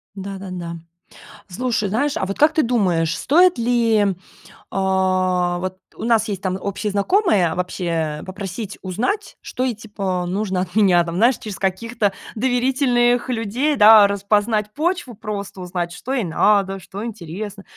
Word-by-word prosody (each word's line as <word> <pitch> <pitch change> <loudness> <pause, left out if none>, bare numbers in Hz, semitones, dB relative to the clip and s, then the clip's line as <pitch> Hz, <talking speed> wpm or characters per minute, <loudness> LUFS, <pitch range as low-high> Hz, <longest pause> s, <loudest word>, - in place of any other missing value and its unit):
Да-да-да. 190 -3 -6 0.7
Слушай, 215 +1 -1
знаешь, 280 +8 0
а, - - -1
вот, 195 +1 -4
как 305 +2 +4
ты 315 - +3
думаешь, 185 - +1
стоит 350 +4 +4
ли, 230 -3 +2 0.7
а, 185 -2 +1
вот, 185 +1 -4 0.2
у - - -8
нас 230 -1 +2
есть, 200 -3 -4
там, 185 -1 -2
общие 200 +2 -3
знакомые, 200 - +2
вообще 165 -4 -2
попросить 195 +2 -6
узнать, 245 - -3
что 255 - -4
ей, 255 -3 0
типа, 195 -4 -3
нужно 190 0 -1
от 180 0 -6
меня, 190 -5 +5
там, 170 0 -5
знаешь, 235 +5 +4
через 210 -3 -8
каких-то 205 +2 -1 0.2
доверительных 245 0 +2
людей, 245 +5 0
да, 215 -3 +8
распознать 210 +1 0
почву, 340 -4 -1
просто 200 -3 -6
узнать, 175 -1 -3
что 250 +9 -5
ей 255 -4 0
надо, 195 +2 +2
что 195 +4 -7
интересно, 200 -1 -7
205 Hz, 145 wpm, -20 LUFS, 185-235 Hz, 0.7 s, да